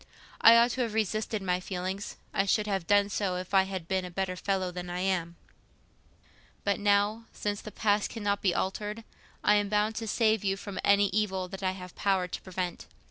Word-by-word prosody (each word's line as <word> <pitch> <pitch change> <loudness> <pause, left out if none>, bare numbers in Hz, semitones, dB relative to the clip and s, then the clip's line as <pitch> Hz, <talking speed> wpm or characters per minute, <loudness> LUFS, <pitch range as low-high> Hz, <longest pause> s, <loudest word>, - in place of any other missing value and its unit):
I 230 - +9
ought 235 +1 +5
to 255 - -2
have 230 -3 -2
resisted 215 0 -1
my 180 -1 +1
feelings. 185 +2 -4 0.2
I 195 - +1
should 210 +2 +2
have 195 -5 -2
done 205 0 +4
so, 195 -2 -1
if 185 +2 -6
I 190 -1 +5
had 190 -4 -5
been 190 0 0
a 180 - -6
better 185 +1 -2
fellow 185 -1 -1
than 180 0 -6
I 175 +1 -3
am; 180 -3 -1 1.3
but 200 -1 +1
now, 205 +2 +2
since 205 -1 -3
the - - -8
past 205 -1 +1
cannot 205 -3 -2
be 185 -4 +2
altered, 210 +3 -2 0.4
I 210 - +5
am 205 -1 0
bound 210 +1 +1
to 225 - -3
save 220 -1 +2
you 195 -1 0
from 200 -1 -7
any 200 0 +4
evil 190 -2 -1
that 195 +1 -7
I 185 -1 0
have 180 -1 -9
power 190 -3 +1
to - - -6
prevent. 180 -2 -4
195 Hz, 205 wpm, -29 LUFS, 185-210 Hz, 1.3 s, I